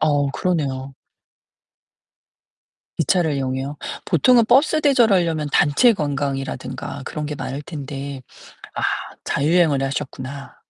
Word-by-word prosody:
어, 145 -2 +2
그러네요. 135 -5 -2 2.0
기차를 160 0 +2
이용해요. 135 +1 -3 0.3
보통은 235 - +4
버스 285 +6 +4
대절하려면 195 - +3
단체 150 - +5
관광이라든가 140 - -3
그런 150 +3 -4
게 150 - -4
많을 140 0 -5
텐데, 140 -3 -6 0.5
아 - - -3 0.4
자유여행을 150 -1 +2
하셨구나. 135 0 -5
145 Hz, 265 characters per minute, -21 LUFS, 135-175 Hz, 2.0 s, 단체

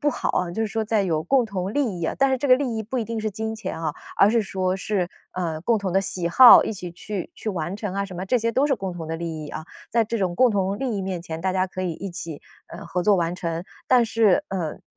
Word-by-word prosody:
不 295 0 +2
好 - - -2
啊， 180 -1 -1
就 200 +6 -4
是 - - 0
说 220 +1 -2
在 215 -1 +1
有 160 -4 0
共 260 +5 +3
同 195 -2 -4
利 230 -11 -1
益 165 - -2
啊， - - 0
但 275 0 +4
是 265 - +2
这 280 +2 -2
个 255 - +8
利 255 -5 -2
益 220 - -2
不 245 +4 -3
一 225 - -1
定 225 -1 -4
是 215 0 -2
金 220 +2 -4
钱 215 -6 -5
啊， 155 -2 -2 0.2
而 200 - +6
是 230 0 +2
说 185 -1 -1
是， 195 -3 -1 0.2
呃， 165 -4 -3
共 225 +5 +2
同 190 -3 -3
的 195 - +3
喜 180 -3 -2
好， 245 +8 +9
一 - - -2
起 180 -4 -7
去 190 +2 -6
去 220 - -5
完 180 0 -3
成 205 -3 -4
啊 200 0 -1
什 190 -2 -9
么 185 +2 -4
这 250 - +2
些 230 0 0
都 265 +5 +2
是 275 - +2
共 190 -5 -5
同 165 -2 -7
的 165 - -3
利 160 -2 -5
益 - - -8
啊。 155 - -6 0.3
在 230 0 +3
这 230 +1 -3
种 180 -3 0
共 250 +5 +4
同 195 -1 0
利 245 -4 -2
益 - - -2
面 185 -3 -4
前， 165 -1 -6
大 190 +1 0
家 185 0 0
可 185 0 -5
以 175 -2 -1
一 195 +3 -6
起， 165 -3 -7 0.2
呃， 170 - -10
合 180 - -2
作 210 - +5
完 170 -1 0
成。 170 0 -3 0.2
但 250 -2 +5
是， 220 -4 +3
嗯， 175 -5 -4
195 Hz, 315 characters per minute, -24 LUFS, 175-225 Hz, 0.3 s, 好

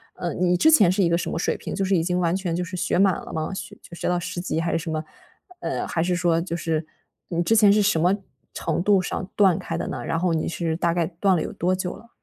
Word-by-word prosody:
呃， 175 - -3
你 180 0 +2
之 315 - +5
前 210 - +6
是 190 +1 +2
一 170 - +3
个 170 - +2
什 175 - -3
么 - - -3
水 - - 0
平， - - -6
就 195 - -1
是 195 - 0
已 - - +2
经 180 +1 0
完 170 -1 +1
全 185 -3 -2
就 180 - -1
是 180 +1 -6
学 - - 0
满 195 -3 +4
了 - - -9
吗？ 155 +2 -2
学 175 -2 -7
到 180 - +1
10 175 - -5
级 165 -2 -2
还 165 - -1
是 - - +1
什 165 - -6
么， 155 0 -2 0.6
呃， - - -2
还 165 - 0
是 180 0 0
说 170 -2 +2
就 170 -1 -4
是， 160 -1 -2 0.4
你 170 -1 0
之 225 - +2
前 210 -2 +6
是 210 - +3
什 200 -5 +2
么 180 +4 +3 0.4
程 - - -2
度 200 -1 +4
上 185 +1 -4
断 190 -5 +4
开 - - -4
的 - - -3
呢？ - - -5
然 165 - -1
后 175 -1 +1
你 160 - -1
是， 165 -1 -2
大 170 -1 +1
概 170 -2 0
断 185 +3 +1
了 165 - 0
有 - - -4
多 180 +2 0
久 185 -1 -4
了？ 230 +4 -16
175 Hz, 300 characters per minute, -24 LUFS, 165-190 Hz, 0.6 s, 前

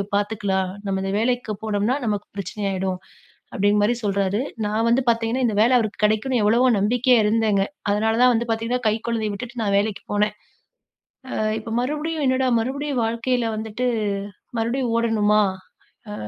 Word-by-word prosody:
பாத்துக்கலாம். 200 -3 -1
நம்ம 195 -1 -1
இந்த 195 - -2
வேலைக்கு 240 -1 0
போனோம்ன்னா, 215 +3 0
நமக்கு 205 -2 -2
பிரச்சனையா 200 +1 -3
ஆயிடும்." 185 -1 -2 0.6
அப்டிங்கிற 205 +1 +2
மாரி 240 +3 +2
சொல்றாரு. 200 +1 0 0.2
நான் 220 +2 0
வந்து 245 +2 +3
பாத்தீங்கன்னா, 230 +2 0
இந்த 215 - -1
வேல 240 +3 +5
அவருக்கு 215 -2 -3
கெடைக்கும்னு 220 +3 +1
எவ்வளவோ 235 +5 +4
நம்பிக்கையா 245 +5 +3
இருந்தேங்க. 210 -2 +2 0.3
அதனாலதான் 225 +4 +3
வந்து 235 +1 -1
பாத்தீங்கன்னா, 230 +2 -1
கை 215 - +3
குழந்தைய 220 -3 -1
விட்டுட்டு 240 +3 -6
நான் 200 -2 +1
வேலைக்கு 205 0 -1
போனேன். 210 0 +1 1.0
அ - - -2 0.2
"இப்ப 225 +1 -5
மறுபடியும் 300 +3 -2
என்னடா 260 0 +2
மறுபடியும் 270 +1 -2
வாழ்க்கைல 235 +1 0
வந்துட்டு, 220 +3 -3 0.7
மறுபடியும் 235 +1 -1
ஓடணுமா? 215 -2 +3 0.7
அ - - -5
225 Hz, 145 wpm, -22 LUFS, 205-245 Hz, 1.0 s, வேல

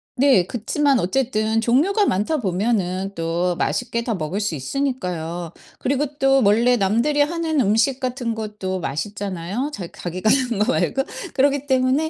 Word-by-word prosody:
네. 260 -9 +4
그치만 270 +4 +1
어쨌든 220 +1 0
종류가 315 - +3
많다 215 - 0
보면은 195 -3 -1
또 170 +2 -1
맛있게 235 +5 -1
다 230 -2 -1
먹을 180 +4 -3
수 205 -4 -1
있으니까요. 175 - -3 0.3
그리고 280 +3 0
또 270 -1 +4
원래 230 +5 +4
남들이 235 +8 +2
하는 320 -1 +1
음식 225 +5 +2
같은 250 -3 -2
것도 210 -4 -4
맛있잖아요, 200 - -3
자 185 -8 -5
자기가 180 +4 -2
하는 240 -5 +2
거 255 - +1
말고. 270 - +1 0.3
그렇기 280 +1 +1
때문에 265 +4 +2
230 Hz, 325 characters per minute, -21 LUFS, 190-270 Hz, 0.3 s, 네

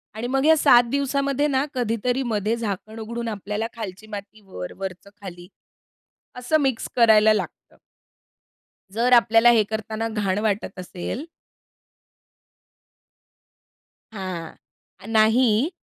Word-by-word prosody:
आणि 235 +3 -4
मग 270 +2 0
या 320 0 +6
7 245 -3 +6
दिवसामध्ये 280 +1 0
ना, 270 0 +1
कधीतरी 245 +2 -1
मध्ये 220 -1 -1
झाकण 220 0 -5
उघडून 235 +1 -5
आपल्याला 210 +1 -4
खालची 215 -2 -8
माती 210 0 -9
वर, 90 - -8
वरच 190 0 -7
खाली, 175 -2 -10 0.9
असं 250 +6 0
मिक्स 265 -4 -1
करायला 220 -2 +5
लागतं. 215 - -5 1.2
जर 235 +3 +1
आपल्याला 230 0 +6
हे 225 -2 +4
करतांना 220 +1 -3
घाण 205 -3 -1
वाटत 205 -3 -2
असेल 185 - -6 2.9
हां, 185 -5 -6 0.5
नाही. 225 +4 +3
220 Hz, 110 wpm, -23 LUFS, 205-245 Hz, 2.9 s, या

